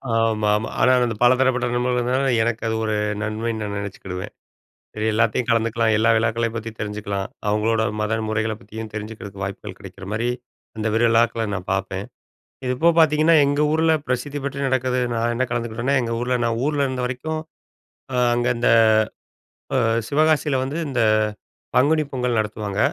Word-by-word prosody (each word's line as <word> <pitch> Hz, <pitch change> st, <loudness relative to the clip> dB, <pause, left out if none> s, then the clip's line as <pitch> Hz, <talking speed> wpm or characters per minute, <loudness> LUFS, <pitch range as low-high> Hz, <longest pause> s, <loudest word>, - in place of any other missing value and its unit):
ஆமாமா. 110 Hz, -1 st, +1 dB
ஆனால், 130 Hz, -1 st, +4 dB
அந்த 115 Hz, -, -3 dB
பல 120 Hz, +1 st, +6 dB
தரப்பட்ட 130 Hz, -2 st, +2 dB
நண்பர்கள் 125 Hz, 0 st, +1 dB
இருந்தனால, 130 Hz, +3 st, 0 dB, 0.2 s
எனக்கு 115 Hz, 0 st, -1 dB
அது 110 Hz, -, 0 dB
ஒரு 110 Hz, -1 st, 0 dB, 0.3 s
நன்மைன்னு 110 Hz, +1 st, -2 dB
நான் 100 Hz, -1 st, -4 dB
நெனைச்சிக்கிடுவேன். 95 Hz, -2 st, -6 dB, 0.7 s
இது 110 Hz, 0 st, -1 dB
எல்லாத்தயும் 115 Hz, +2 st, +1 dB
கலந்துக்கலாம், 115 Hz, -1 st, +2 dB
எல்லா 110 Hz, +1 st, +3 dB
விழாக்களயும் 115 Hz, +1 st, 0 dB
பத்தி 115 Hz, 0 st, -4 dB
தெரிஞ்சுக்கலாம். 105 Hz, -1 st, -3 dB, 0.2 s
அவங்களோட 110 Hz, +2 st, +1 dB, 0.2 s
மத 105 Hz, 0 st, -1 dB, 0.2 s
முறைகள 110 Hz, 0 st, 0 dB
பத்தியும் 110 Hz, -2 st, -8 dB
தெரிஞ்சுக்கிறதுக்கு 105 Hz, -2 st, -7 dB
வாய்ப்புகள் 100 Hz, 0 st, -7 dB
கிடைக்கிற 95 Hz, 0 st, -11 dB
மாதிரி, 115 Hz, +3 st, -1 dB, 0.5 s
அந்த 110 Hz, 0 st, -3 dB
விரு 115 Hz, +1 st, +3 dB
விழாக்கள 115 Hz, 0 st, +2 dB
நான் 90 Hz, -2 st, -6 dB
பாப்பேன். 95 Hz, 0 st, -3 dB, 0.7 s
இப்போ 160 Hz, +7 st, +3 dB
பாத்தீங்கன்னா, 155 Hz, +1 st, +5 dB
எங்க 145 Hz, +1 st, 0 dB
ஊருல 160 Hz, +1 st, +3 dB
பிரசித்தி 130 Hz, +3 st, -2 dB
பெற்று 140 Hz, 0 st, -2 dB
நடக்குது 130 Hz, -1 st, 0 dB, 0.2 s
நான் 115 Hz, +1 st, 0 dB
என்ன 130 Hz, +2 st, +1 dB
கலந்துக்கிட்டேன்னா, 120 Hz, +3 st, -1 dB
எங்க 115 Hz, -1 st, -3 dB
ஊருல 125 Hz, +1 st, 0 dB
நான் 115 Hz, -1 st, 0 dB
ஊர்ல 145 Hz, -2 st, +1 dB
இருந்த 130 Hz, -1 st, -3 dB
வரைக்கும் 155 Hz, +6 st, -3 dB, 0.7 s
அ -, -, 0 dB, 0.2 s
அங்க 120 Hz, 0 st, 0 dB
இந்த 120 Hz, -, +2 dB, 1.1 s
அ -, -, +3 dB, 0.3 s
சிவகாசியில 150 Hz, -1 st, +2 dB
வந்து 140 Hz, +4 st, -4 dB
இந்த 130 Hz, -4 st, 0 dB, 0.7 s
பங்குனி 155 Hz, +4 st, +4 dB
பொங்கல் 125 Hz, -2 st, -1 dB
நடத்துவாங்க. 105 Hz, -2 st, -3 dB
115 Hz, 155 wpm, -22 LUFS, 110-130 Hz, 1.1 s, பல